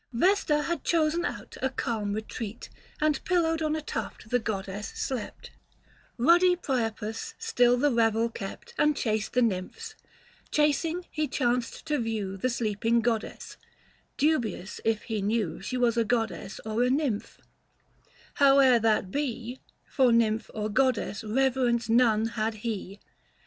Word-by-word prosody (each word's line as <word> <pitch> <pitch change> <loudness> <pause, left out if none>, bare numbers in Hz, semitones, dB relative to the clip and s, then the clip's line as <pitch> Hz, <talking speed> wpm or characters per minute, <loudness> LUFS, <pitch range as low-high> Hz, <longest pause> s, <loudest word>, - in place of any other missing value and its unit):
Vesta 300 - +2
had 340 +2 -2
chosen 330 0 +1
out - - -5
a 265 - +1
calm 215 -5 -2
retreat, 220 +1 -6 0.3
And 305 -2 +1
pillowed 325 -3 +1
on 310 0 0
a 310 - -4
tuft 225 - -6
the 245 - +3
goddess 200 -2 -4
slept; 250 -6 -5 0.7
Euddy 350 +7 +5
Priapus 225 -6 -3
still 245 0 +3
the 290 +3 +2
revel 225 -1 +2
kept, 200 -4 -8
395 - - +3
And 300 -1 +2
chased 215 -2 -1
the 250 - +3
nymphs; 230 - -3 0.6
chasing 320 +4 +1
he 305 -1 -1
chanced 245 -1 -1
to 300 -2 0
view 220 -4 -2
The 225 +7 -1
sleeping 230 0 +1
goddess, 230 -2 -3 0.6
dubious 235 - 0
if 225 -1 0
he 220 -2 -3
knew 205 -5 -1
She 255 +6 -3
was 240 -2 +2
a 230 - +4
goddess 220 -4 -2
or 220 +2 -1
a 250 - +3
nymph; 260 -6 -1 1.0
howe'er 270 -3 +6
that 215 -4 +1
be 250 -2 -3 0.3
For 260 -4 +3
nymph 225 -1 +2
or 215 0 -2
goddess 250 -2 0
reverence 240 0 +1
none 225 -2 +4
had 220 0 -2
he. 200 -3 -4
235 Hz, 145 wpm, -28 LUFS, 220-280 Hz, 1.0 s, howe'er